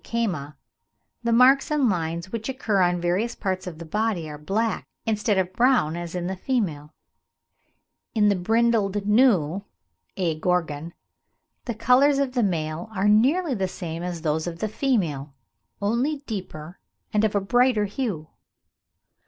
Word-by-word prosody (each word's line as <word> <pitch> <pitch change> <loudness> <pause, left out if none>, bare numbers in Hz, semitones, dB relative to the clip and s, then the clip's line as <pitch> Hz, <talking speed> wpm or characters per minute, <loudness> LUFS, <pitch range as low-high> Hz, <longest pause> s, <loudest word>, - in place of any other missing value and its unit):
caama, 175 -11 -2 0.7
the 235 -1 0
marks 255 +4 +5
and 295 -4 +2
lines 170 -2 -2
which 230 +1 -4
occur 225 -7 0
on 175 0 +2
various 185 +8 0
parts 185 -2 -3
of 170 -3 -6
the 170 - -8
body 210 -1 -1
are 150 -1 -8
black, 215 +8 -1 0.2
instead 210 -2 +1
of 185 -1 0
brown 240 - +3
as 175 0 -6
in 175 -1 -2
the 190 +1 -2
female; 180 - -2 1.2
in 210 -2 +4
the 200 - +3
brindled 210 0 +1
gnu 205 - +3 0.6
(A. 165 -5 -1
gorgon) 165 -2 -1 0.7
"the 235 - -3
colours 255 +5 +4
of 275 -2 0
the 250 - +1
male 165 -2 -2
are 195 +1 +1
nearly 270 +10 +3
the 195 -5 -1
same 170 -3 -6
as 175 -2 -5
those 155 +1 0
of 170 -1 -5
the 215 - -2
female, 170 - -1 0.5
only 265 +8 0
deeper 180 -5 -7 0.3
and 210 0 +2
of 215 -1 +1
a - - +4
brighter 245 +1 +2
hue." 200 - -3
200 Hz, 155 wpm, -24 LUFS, 170-235 Hz, 1.2 s, marks